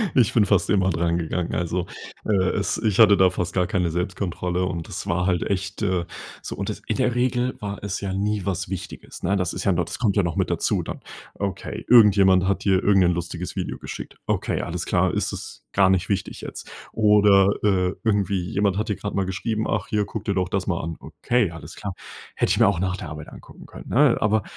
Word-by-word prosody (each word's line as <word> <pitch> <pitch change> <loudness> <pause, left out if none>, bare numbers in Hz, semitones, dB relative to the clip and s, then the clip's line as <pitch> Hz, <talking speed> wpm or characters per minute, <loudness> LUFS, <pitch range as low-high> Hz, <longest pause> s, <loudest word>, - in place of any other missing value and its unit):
Ich 120 -6 +4
bin 110 -3 +4
fast 95 -4 +2
immer 95 -2 +3
dran 85 0 0
gegangen. 85 +1 -2
Also, 85 +1 -1 0.4
äh, 110 - +1 0.2
es - - -1
ich 105 -1 0
hatte 105 -2 +8
da 95 -1 +5
fast 90 -1 -3
gar 90 -2 +1
keine 90 -5 0
Selbstkontrolle. 90 0 -2
Und 85 -2 -4
das - - -6
war 90 +1 0
halt 90 -2 +1
echt, 95 0 -3
äh, 95 -4 0 0.4
so - - -6
und - - -4
das - - -5
in - - -1
der 125 -2 +1
Regel 125 0 0
war 100 -1 -5
es 100 -1 -3
ja 95 -2 -3
nie 105 0 -1
was 90 -2 -2
Wichtiges, 95 -3 -7
ne? 100 +3 +1
Das 90 -3 -1
ist 90 - -4
ja 100 - +3
no 90 -1 +1
das - - -7
kommt 110 -5 +1
ja 100 - +4
noch 85 -2 -2
mit - - 0
dazu, - - 0
dann. - - -7 0.3
Okay, 100 -3 -4
irgendjemand 100 -5 +6
hat 100 - 0
dir 95 -1 +2
irgend 100 -2 +4
'nen 90 0 +3
lustiges 85 +1 -5
Video - - -3
geschickt. - - -8
Okay, - - -1
alles - - -4
klar. - - +1
Ist - - -1
das - - -8
gar 95 -1 +4
nicht 95 +1 +1
wichtig 100 -2 -2
jetzt? - - -8 0.2
Oder, 105 -2 +5
äh, 95 -3 +2
irgendwie 100 -4 +1
jemand 100 -1 +1
hat 110 - -2
dir 105 - 0
gerade 105 +3 -5
mal 95 - +1
geschrieben: 110 +4 -2
„Ach, 105 -3 -1
hier, 105 -1 0
guck 105 0 -6
dir 100 - 0
doch 90 -1 0
das 95 0 -2
mal 85 -3 0
an." 80 0 -5
Okay, 120 -7 -1
alles 80 -1 -10
klar. 100 -2 -5 0.4
Hätte - - +1
ich - - +2
mir - - +6
auch 100 -4 +1
nach 95 0 -1
der 90 - -7
Arbeit 75 0 -8
angucken - - -14
können, - - -11
ne? 135 -1 +4
Aber 105 0 +2
95 Hz, 230 wpm, -23 LUFS, 90-105 Hz, 0.4 s, hatte